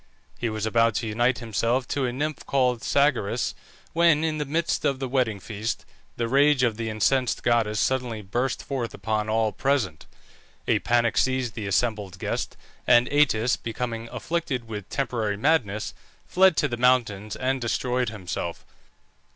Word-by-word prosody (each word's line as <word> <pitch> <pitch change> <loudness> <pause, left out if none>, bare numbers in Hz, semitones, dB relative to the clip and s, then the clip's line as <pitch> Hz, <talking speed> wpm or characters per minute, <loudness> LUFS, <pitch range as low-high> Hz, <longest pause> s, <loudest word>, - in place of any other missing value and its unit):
He 120 - -1
was 110 -1 -3
about 115 0 +3
to 115 - -1
unite 120 +4 +1
himself 115 +2 -1
to 140 -2 0
a - - -2
nymph 150 +4 -3
called 125 -3 +1
Sagaris, 140 -8 +1 0.4
when, 165 -2 +4
in 155 -1 -1
the 150 - -1
midst 160 +4 -1
of 140 -2 +1
the 135 0 -3
wedding 125 -5 0
feast, 110 +4 -4 0.3
the 115 - 0
rage 140 +1 +4
of 115 -3 +2
the 115 0 -3
incensed 125 +4 +1
goddess 115 -3 +2
suddenly 125 -5 -1
burst 120 +7 -2
forth 130 -4 -3
upon 110 +1 -2
all 110 0 +2
present. 125 - -1 0.6
A - - +3
panic 120 -2 +2
seized 130 -3 0
the 105 -3 -5
assembled 105 -2 -1
guests, - - -3 0.3
and 120 0 +6
Atys, 130 -5 +3
becoming 115 0 -4
afflicted 155 -8 -3
with 105 -3 -7
temporary 115 -7 -1
madness, 110 -6 +1 0.3
fled 190 -2 +4
to 150 - +3
the 120 -3 -4
mountains 115 -5 +2
and 130 0 -1
destroyed 125 +1 0
himself. 90 -5 -5
120 Hz, 160 wpm, -25 LUFS, 110-130 Hz, 0.6 s, and